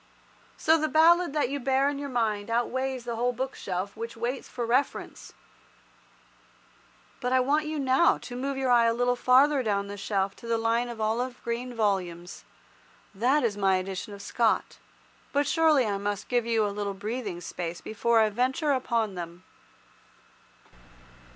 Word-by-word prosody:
So 320 +1 +3
the 310 - +1
ballad 335 +2 +5
that 295 -5 +1
you 285 +1 -3
bear 270 +1 +2
in 285 -1 -2
your 285 -1 -5
mind 220 -4 -1
outweighs 255 +2 -1
the 235 -1 -4
whole 245 +2 +1
bookshelf 200 -7 -4
which 230 +1 -6
waits 245 +3 -3
for 240 -2 -4
reference. 255 +5 -1 1.9
But 250 - -2
I 260 - +5
want 295 +4 +1
you 310 0 -3
now 270 +4 +3
to 245 - -9
move 270 +2 -3
your 265 -2 0
eye 240 -1 +5
a 230 - +1
little 245 +1 +1
farther 265 +3 +4
down 200 -4 0
the 200 0 -7
shelf 195 -1 -1
to 235 - -11
the 230 0 +1
line 230 +2 0
of 235 -2 -7
olive 240 +4 -1
green 235 +2 -3
volumes. 180 -5 -2 0.7
That 255 +8 +2
is 225 -4 0
my 195 -2 +2
edition 185 +2 -4
of 200 - -11
Scott. 230 -2 0 0.5
But 285 0 +2
surely 315 -6 +3
I 200 -2 -1
must 205 0 -3
give 240 -2 +1
you 225 -2 +2
a 205 - -2
little 200 -1 -3
breathing 210 -2 -4
space 175 0 -5
before 225 +1 +1
I 215 -1 +2
venture 260 +7 0
upon 235 -5 0
them. 175 0 -8
235 Hz, 170 wpm, -27 LUFS, 205-265 Hz, 1.9 s, ballad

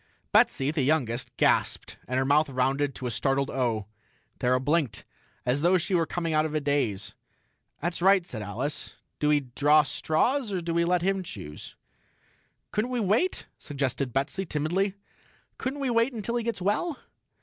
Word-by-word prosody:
Betsy, 135 +2 +3
the 155 -2 -1
youngest, 130 -4 0
gasped, - - +1
and 125 - -1
her 130 - +2
mouth 145 +2 +3
rounded 135 +2 0
to 130 - -6
a 125 - -1
startled 135 +4 0
O. 120 -5 0 0.5
Thera 125 0 +2
blinked, 140 -5 0 0.4
as 125 +3 +1
though 175 +3 +4
she 175 +2 -2
were 165 -3 +2
coming 165 -2 -2
out 155 0 +3
of 155 -1 -3
a - - +3
daze. 140 -9 -1 0.7
"That's 170 +2 -2
right," 190 -1 +5
said 115 -9 -6
Alice. 115 +9 -4 0.2
"Do 150 - +2
we 150 -1 +4
draw 145 +4 +4
straws, 230 - 0
or 190 - -1
do 170 -1 -3
we 170 0 +2
let 175 0 +2
him 195 +1 +1
choose?" 90 - -9 1.0
"Couldn't 215 +4 0
we 250 -1 -1
wait?" 220 - +1
suggested 140 -2 -2
Betsy 140 +9 -1
timidly. 180 +5 -1 0.6
"Couldn't 270 +2 -3
we 265 -3 0
wait 230 +3 +2
until 230 +1 -3
he 235 - -1
gets 225 -5 -3
well?" 250 - 0
155 Hz, 170 wpm, -27 LUFS, 135-190 Hz, 1.0 s, right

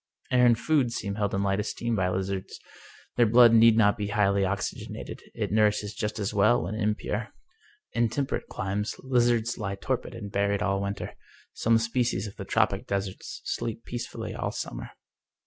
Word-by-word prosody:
Air 125 -1 +5
and 120 -1 +5
food 140 -3 +2
seem 100 -3 -3
held 100 -1 -1
in 100 - 0
light 100 0 +1
esteem 115 +2 -2
by 95 -3 +1
lizards. 95 +1 -3 0.6
Their 120 -2 +5
blood 120 +1 +7
need 115 0 +7
not 105 -1 +4
be 105 - -1
highly 100 -2 +2
oxygenated; 100 +1 -4
it - - -2
nourishes 105 -1 +2
just 105 0 -3
as 105 -1 -2
well 105 -2 +4
when 90 +5 -4
im 105 -1 0
pure. 110 +1 -3 0.7
In 115 -1 +2
temperate 135 +3 -2
climes 100 +3 -3
lizards 120 -3 +2
lie 100 -2 -2
torpid 125 +4 -3
and 100 -3 -7
buried 100 0 +1
all 100 -1 0
winter 100 0 -4 0.2
{ - - -29
some 115 0 +5
species 115 +1 0
of 100 - -8
the - - -7
tropic - - +1
deserts 100 -1 -4
sleep 115 0 -3
peacefully 120 0 -5
all - - -2
summer. - - -5
105 Hz, 180 wpm, -27 LUFS, 100-115 Hz, 0.7 s, blood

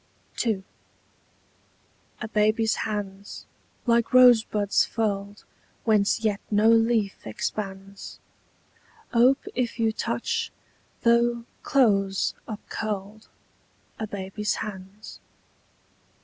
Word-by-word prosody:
II. 215 -5 -1 1.6
A - - -3
baby's 215 +1 +2
hands, 200 -1 -6 0.4
like 235 0 +2
rosebuds 220 -5 +5
furled 205 -2 -3 0.4
Whence 215 -1 +2
yet 210 -3 0
no 215 +1 +4
leaf 225 - +2
expands, 195 - -5 1.0
Ope 250 +3 +4
if 245 -2 -2
you 225 -1 +2
touch, - - -2 0.5
though 235 0 +3 0.2
close 195 -7 +2
upcurled, 210 -1 -5 0.7
A 220 - -3
baby's 200 +1 -3
hands. 200 +1 -8
215 Hz, 80 wpm, -25 LUFS, 200-230 Hz, 1.6 s, rosebuds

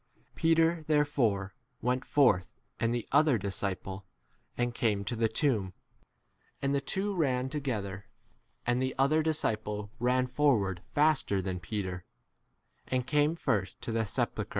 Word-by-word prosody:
Peter 165 0 +3
therefore 120 -10 +1 0.3
went 125 +2 0
forth 100 -11 +3 0.2
and 115 +1 +1
the 120 -1 -2
other 150 -6 +5
disciple, 95 -1 -4 0.5
and 120 0 +1
4 - - -9
came 105 -4 +1
to 120 - -2
the 115 0 +2
tomb. 110 - 0 0.9
And 140 0 0
the 140 - +1
two 200 +7 -1
ran 130 -7 0
together, 105 -9 -3 0.6
and 120 +1 +1
the 130 0 -1
other 140 +4 +3
dis 155 -1 -1
ciple 105 -1 -2
ran 125 +1 +2
forward 125 -9 +1
faster 145 -9 +2
than 95 -1 -3
Peter, 95 -2 -4 0.8
and 130 -1 0
came 150 +2 +2
first 110 - -1
to - - -3
the 115 -1 0
sepulchre, - - -7
i - - -1
See - - -1
note - - -1
to - - +1
chap. - - -16
120 Hz, 165 wpm, -30 LUFS, 100-145 Hz, 0.9 s, other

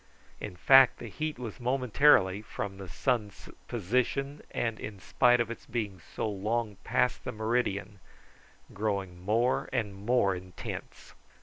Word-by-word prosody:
In 100 -4 -6
fact 135 +7 +7
the 115 - -8
heat 155 +6 -3
was 120 0 -7
momentarily, 125 -5 +4
from 100 -2 -6
the 95 - -7
sun's 110 0 -2 0.2
position, 125 +6 -1
and 115 -2 -2
in 105 -2 -7
spite 120 +5 +3
of 115 -1 0
its 115 - -9
being 105 -5 -3 0.2
so - - -1
long 105 +1 -2
past 125 0 +1
the - - -3
meridian, 110 -3 -1 0.7
growing 95 -4 -3
more 115 +6 +1
and 110 -6 -1
more 100 0 +2
intense. 90 -1 -8
110 Hz, 135 wpm, -30 LUFS, 100-125 Hz, 0.7 s, fact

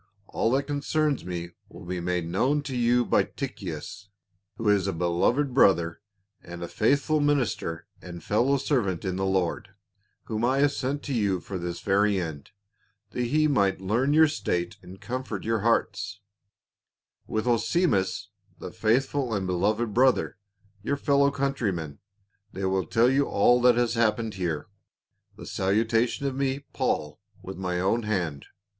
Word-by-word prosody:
All 115 - -1
that 135 +1 +2
concerns 145 0 -1
me 85 -1 -5 0.2
will - - -12
be 90 0 -3
made 90 -1 -1
known 135 - +1
to 130 -2 -5
you 120 0 +2
by - - +3
Tychicus, 100 - -6 0.5
who 115 - -3
is 100 -2 +3
a 95 - -1
beloved 90 - +1
brother, 85 -9 +3 0.4
and 85 0 -8
a - - -4
faithful 145 - +1
minister 125 - 0 0.2
and 85 -2 -9
fellow 125 +7 +2
servant 115 - -1
in 95 -1 -1
the 95 +1 -1
Lord: 95 0 -1 0.5
whom 110 0 -3
I 130 +3 +2
have 145 +1 +3
sent 140 +1 -3
to 140 - -4
you 100 -6 +1
for 95 +1 -6
this 85 0 -5
very 100 0 +2
end, 80 -5 -6 0.6
that 125 - -2
he 155 +5 +2
might 100 -11 +2
learn 115 +9 0
your 160 +1 +6
state 90 - -2
and 95 +2 -12
comfort 125 -5 -5
your 115 0 0
hearts; 105 -2 0 1.1
with 110 +1 -2
Onesi 125 +9 +2
mus, 95 - -1 0.3
the - - -8
faithful 125 +2 0
and 95 -2 -2
beloved 105 +5 0
brother, 125 -4 +2 0.4
your 140 +7 -1
fellow 140 0 +3
countryman; 110 - -2 0.5
they 95 +1 -3
will 95 -3 0
tell 115 +6 +3
you 135 +2 +2
all 120 +5 +4
that 125 -1 +5
has 120 -1 +1
hap 115 -2 +2
pened 115 -2 -4
here 85 -6 -3 0.7
The - - -10
salutation 115 +7 0
of 135 - -1
me, 135 +1 -2
Paul, 75 0 -2 0.2
v/ith 95 0 -7
my 90 -2 -2
own 95 +6 +1
hand. 90 -10 -2
110 Hz, 160 wpm, -26 LUFS, 95-130 Hz, 1.1 s, your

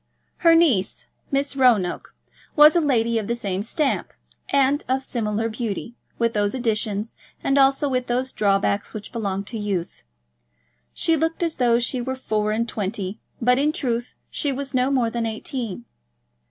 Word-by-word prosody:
Her 335 -1 +5
niece, 275 - +2 0.2
Miss 280 0 -1
Roanoke, 235 -9 +2 0.4
was 300 +1 +8
a 345 - +4
lady 235 -6 +2
of 210 - -5
the 235 - 0
same 195 -5 -3
stamp, 275 +6 -1 0.4
and 280 +1 +2
of 265 +1 0
similar 225 -3 -1
beauty, 230 0 -4 0.2
with 230 -1 +1
those 205 +2 0
additions 220 -3 -1 0.3
and 275 - +2
also 275 +1 +4
with 255 -2 -1
those 255 +2 -1
drawbacks 200 +1 0
which 210 - -7
belong 200 -5 -2
to 225 +2 -6
youth. 195 -5 -3 0.9
She 330 - +1
looked 325 +2 -1
as 330 -2 -1
though 240 -2 +3
she 245 +1 0
were 260 +2 -3
four 215 -4 -1
and 230 +2 0
twenty, 200 -1 -3 0.2
but 250 +2 +3
in 295 +2 +2
truth 245 -7 -3 0.2
she 290 - -1
was 275 +1 -5
no 255 +1 +2
more 250 -4 +1
than 235 -1 -1
eighteen. 220 - -4
235 Hz, 165 wpm, -23 LUFS, 215-270 Hz, 0.9 s, was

